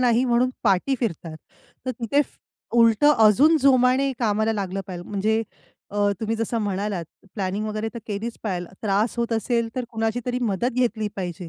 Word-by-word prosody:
नाही 245 0 +3
म्हणून 245 0 +2
पाठी 205 +5 +2
फिरतात. 165 -8 -3 0.5
तर - - +1
तिथे 250 +3 0
फ - - -18 0.4
उलटं 230 +5 +5
अजून 275 +10 +6
जोमाने 265 0 +4
कामाला 220 -1 +1
लागलं 195 -2 -3
पाहिजे 180 -2 -6
म्हणजे 215 +2 +1 0.5
अ, 205 0 +1
तुम्ही 225 0 -1
जसं 230 +1 -1
म्हणालात 200 -3 -2 0.3
प्लॅनिंग 200 +1 -2
वगैरे 215 +1 -3
तर - - -4
केलीच 220 +2 -4
पाहिजे, 180 -5 -3 0.2
त्रास 210 +3 +1
होत 235 0 0
असेल 230 +1 0
तर 255 - -1
कुणाची 225 0 -1
तरी 250 0 -1
मदत 230 +2 0
घेतली 225 -4 +1
पाहिजे. 180 -2 -5
225 Hz, 165 wpm, -24 LUFS, 205-245 Hz, 0.5 s, अजून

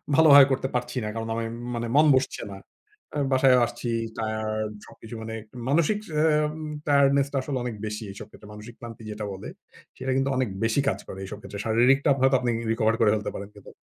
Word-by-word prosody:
ভালোভাবে 145 -4 +8
করতে 130 0 0
পারছি 125 +1 -2
না। - - -3
কারণ 115 0 -4
আমার 115 0 -3 0.2
মানে 120 0 -3
মন 155 +1 +6
বসছে 130 0 -1
না। 95 - -8 0.6
অ্যা 150 - -1
বাসায় 130 -1 +5
আসছি, 120 0 -6 0.3
টায়ার্ড 110 -1 -2
সবকিছু 115 +1 -11
মানে 110 0 -6 0.4
মানসিক 170 +8 +2 0.2
অ্যাম 150 -1 +2 0.4
tiredness 140 -1 +4
টা 140 - 0
আসলে 135 0 -3
অনেক 120 -3 -4
বেশি 105 +1 -4
এইসব 100 - -10
ক্ষেত্রে। 105 - -15
মানসিক 110 +3 -11
ক্লান্তি 115 -1 -10
যেটা 105 0 -5
বলে। 95 - -8 0.5
সেটা 130 +1 -3
কিন্তু 135 +1 +1
অনেক 130 -4 0
বেশি 115 +5 +1
কাজ - - -2
করে 95 - -8
এইসব 100 - -7
ক্ষেত্রে। 100 - -8
শারীরিকটা 125 +6 +3
আপ 135 - +4
আপনি 130 - -2
হয়তো 135 -1 +4
আপনিই 120 -2 0 0.2
recover 115 0 +2
করে 110 - +4
ফেলতে 105 -1 -2
পারেন 100 0 -7
কিন্তু 100 - -13
120 Hz, 205 wpm, -25 LUFS, 110-135 Hz, 0.6 s, ভালোভাবে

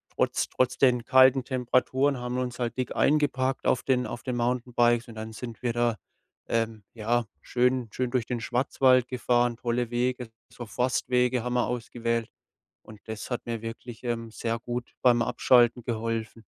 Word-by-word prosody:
trotz - - +1
trotz 130 - 0
den 125 -3 +4
kalten 130 0 +6
Temperaturen 130 +2 +1
haben 125 0 -4
wir - - 0
uns 125 -1 -4
halt 120 -2 -2
dick 130 - -3
eingepackt 135 -3 +1
auf 125 - +2
den 125 -2 +1
auf 120 - -7
den 125 -2 -3
Mountainbikes 120 -1 +1
und 115 - -11
dann 110 0 -6
sind 115 -2 -8
wir 120 -2 -1
da, 120 -1 +1 0.5
äh, 115 0 +1 0.3
ja, 120 +1 0 0.2
schön 125 -1 +1
schön 125 +2 -2
durch 120 -2 0
den 120 0 -3
Schwarzwald 130 +1 +2
gefahren, 120 -1 +1
tolle 120 0 -2
Wege. 125 0 -1 0.2
So 120 - -8
Forstwege 125 +1 0
haben 125 0 -2
wir 125 -1 +1
ausgewählt. 115 -1 -2 0.5
Und 110 -1 -14
das 110 +2 -6
hat 125 - -3
mir 115 -2 -4
wirklich, 115 0 -8
ähm, 115 -1 -3
sehr 115 +1 -3
gut 120 +1 -5
beim 120 -2 +5
Abschalten 120 0 +3
geholfen. 115 -1 -3
120 Hz, 170 wpm, -27 LUFS, 115-125 Hz, 0.5 s, kalten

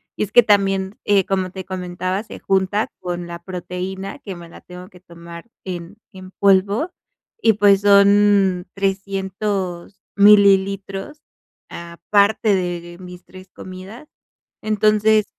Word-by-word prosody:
y - - -2
es 205 - -6
que 240 - +7
también, 195 -2 +1
eh, 200 -2 +2
como 190 -2 -2
te 190 0 -7
comentaba, 185 +1 -4
se - - -11
junta 195 +2 0
con 175 -1 -5
la 170 0 -7
proteína 185 +2 -6
que 195 - -9
me 170 -1 -12
la - - -14
tengo 180 +1 -12
que 185 - -18
tomar 170 0 -12 0.2
en 180 +2 -7
en 185 -1 -12
polvo, 200 - +2 0.5
y 225 - +3
pues, 200 -1 +4
son 200 -2 +4
300 195 -1 -3
mililitros 200 +4 +3 0.5
aparte 200 +5 0
de 175 -2 -4
mis 180 -1 -12
3 185 0 -14
comidas, 190 +9 -11 0.5
entonces, 215 0 +2
195 Hz, 130 wpm, -19 LUFS, 180-205 Hz, 0.5 s, que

